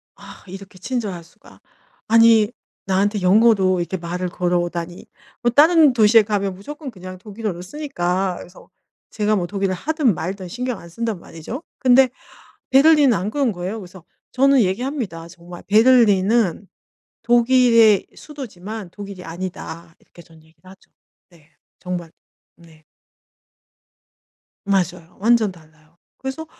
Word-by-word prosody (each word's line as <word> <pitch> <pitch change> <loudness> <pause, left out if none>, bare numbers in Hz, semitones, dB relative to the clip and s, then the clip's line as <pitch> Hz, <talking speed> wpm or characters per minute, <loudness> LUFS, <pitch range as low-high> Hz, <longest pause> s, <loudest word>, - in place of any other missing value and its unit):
'아 - - -14
이렇게 190 0 -11
친절할 205 -6 -4
수가. 165 - -21 0.5
아니 225 -1 +5 0.3
나한테 200 +2 0
영어로 190 -1 +4
이렇게 175 +2 -3
말을 180 +1 -4
걸어오다니.' 175 -1 -3 0.4
뭐 240 -1 +1
다른 305 +1 +5
도시에 225 -1 +5
가면 200 -2 -2
무조건 290 - -9
그냥 185 -3 -10
독일어를 205 -2 -6
쓰니까. 185 -8 -2
그래서 175 - -14 0.4
제가 215 0 0
뭐 180 -3 -2
독일어를 195 -1 -2
하든 300 - 0
말든 185 +4 -5
신경 250 +1 -4
안 170 - -13
쓴단 225 +1 -4
말이죠. 170 - -9 0.2
근데 260 0 +5 0.6
베를린은 285 -1 +5
안 190 +4 -3
그런 275 -3 0
거예요. 185 +5 -5
그래서 185 -3 -13 0.3
저는 270 0 +4
얘기합니다. 195 - -3
정말 175 0 -12
"베를린은 215 -3 +3 0.6
독일의 235 -3 +4
수도지만 220 - -9
독일이 200 -1 -10
아니다." 170 -1 -8
이렇게 175 - -18
전 165 0 -20
얘기를 160 +3 -20
하죠. 190 - -19 0.4
네 165 -3 -23 0.3
정말. 175 -3 -6 0.4
네. 165 -2 -20 1.8
맞아요. 180 -3 -2
완전 225 -1 +3
달라요. 155 -1 -22 0.2
그래서 265 +4 -6
195 Hz, 300 characters per minute, -20 LUFS, 175-235 Hz, 1.8 s, 아니